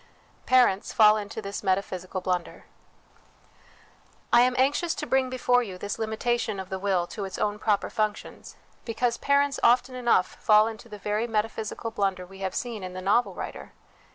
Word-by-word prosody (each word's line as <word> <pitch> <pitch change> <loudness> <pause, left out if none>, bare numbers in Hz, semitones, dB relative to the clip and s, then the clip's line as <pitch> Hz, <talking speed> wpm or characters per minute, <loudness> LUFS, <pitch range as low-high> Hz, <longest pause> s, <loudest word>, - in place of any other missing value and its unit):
Parents 245 -7 +3
fall 215 -2 +6
into 215 +1 -5
this 200 0 -5
Metaphysical 185 -1 -2
Blunder. 180 -1 -3 1.7
I - - +8
am 250 +1 +3
anxious 290 +6 +1
to 300 - -4
bring 265 -2 +1
before 250 -1 +2
you 195 -6 -6
this 205 +2 -5
limitation 220 -1 -1
of 190 -1 -7
the 190 - -4
will 190 -3 +1
to 205 +3 -7
its 190 -1 -6
own 210 0 -1
proper 205 -2 0
functions, 215 -1 -4 0.3
because 235 +1 -1
parents 280 0 +1
often 250 +2 +3
enough 240 -7 +2
fall 215 0 +5
into 225 +1 -7
the 210 - -8
very 210 +3 -2
metaphysical 225 0 -3
blunder 195 -3 -1
we 195 +1 -14
have 190 -1 -3
seen 235 -4 -4
in 185 0 -6
the 185 - -6
novel 210 +6 +2
writer. - - -7
215 Hz, 170 wpm, -26 LUFS, 195-240 Hz, 1.7 s, I